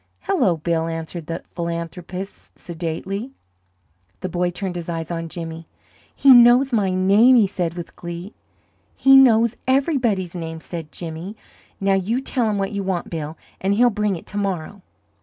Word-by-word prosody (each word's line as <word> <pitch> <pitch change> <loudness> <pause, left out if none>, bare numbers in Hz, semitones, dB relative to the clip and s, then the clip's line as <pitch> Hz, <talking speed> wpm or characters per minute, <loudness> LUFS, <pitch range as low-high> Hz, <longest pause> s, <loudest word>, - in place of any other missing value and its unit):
"Hello, 255 - +1
Bill!" 165 +1 -1
answered 165 0 -5
the 165 0 -5
philanthropist, 170 +3 -6
sedately. 180 +8 -5 0.9
The 185 - -3
boy 175 0 0
turned 180 +1 -5
his 175 -1 -5
eyes 165 0 -4
on 165 -1 -4
Jimmy. 165 -1 -7 0.5
"He 275 - +6
knows 245 +2 +6
my 205 -4 +2
name," 200 +7 +5
he 225 -4 +6
said, 180 -4 -3
with 175 -1 -8
glee. 175 +4 -7 0.6
"He 270 0 +6
knows 235 -3 +6
everybody's 255 - +1
name," 165 -2 -5
said 160 -2 -8
Jimmy. 170 +5 -7 0.4
"Now 195 0 +2
you 195 +6 0
tell 255 -4 -1
him 210 - -1
what 195 -1 -1
you 200 -1 -3
want, 190 -3 -3
Bill, 155 -1 -5 0.2
and 195 +2 +1
he'll 240 +2 +4
bring 210 -2 0
it 165 - -9
to 205 - -7
morrow. 195 -1 -3
185 Hz, 160 wpm, -21 LUFS, 170-215 Hz, 0.9 s, He